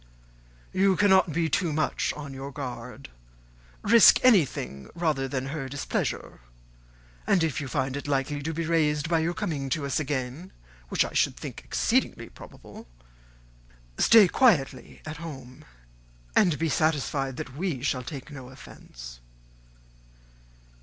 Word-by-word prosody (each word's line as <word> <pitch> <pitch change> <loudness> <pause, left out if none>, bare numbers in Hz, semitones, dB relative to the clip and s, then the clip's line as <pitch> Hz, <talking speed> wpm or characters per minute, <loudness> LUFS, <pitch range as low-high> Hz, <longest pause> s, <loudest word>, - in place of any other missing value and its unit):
"You 190 0 +3
cannot 190 -3 +4
be 165 +2 0
too 165 +2 0
much 155 +1 0
on 145 -2 -8
your 135 +1 -7
guard. 125 -1 -7 0.7
Risk 230 +2 +7
anything 150 - +2
rather 155 -6 0
than 135 0 -3
her 140 -3 -5
displeasure; 145 +1 -3 0.9
and 180 -4 +3
if 155 -2 -1
you 140 - -5
find 130 0 -2
it 145 - -5
likely 145 +1 -1
to 160 +3 -3
be 165 +1 -3
raised 155 -2 +1
by 165 0 +2
your 170 +2 -1
coming 150 -9 -3
to 140 +2 -1
us 140 - -1
again, 140 +3 -4 0.4
which - - +2
I - - -8
should - - +1
think - - -8
exceedingly - - 0
probable, - - -13 1.1
stay 220 -4 +7
quietly 155 - +1
at 155 0 -6
home, 135 -6 -10 0.7
and 175 -7 +4
be 165 - 0
satisfied 145 -4 0
that 130 +1 -7
we 155 -6 -3
shall 130 -3 0
take 140 +2 -8
no 130 -3 -9
offence." - - -12
145 Hz, 140 wpm, -26 LUFS, 135-165 Hz, 1.1 s, Risk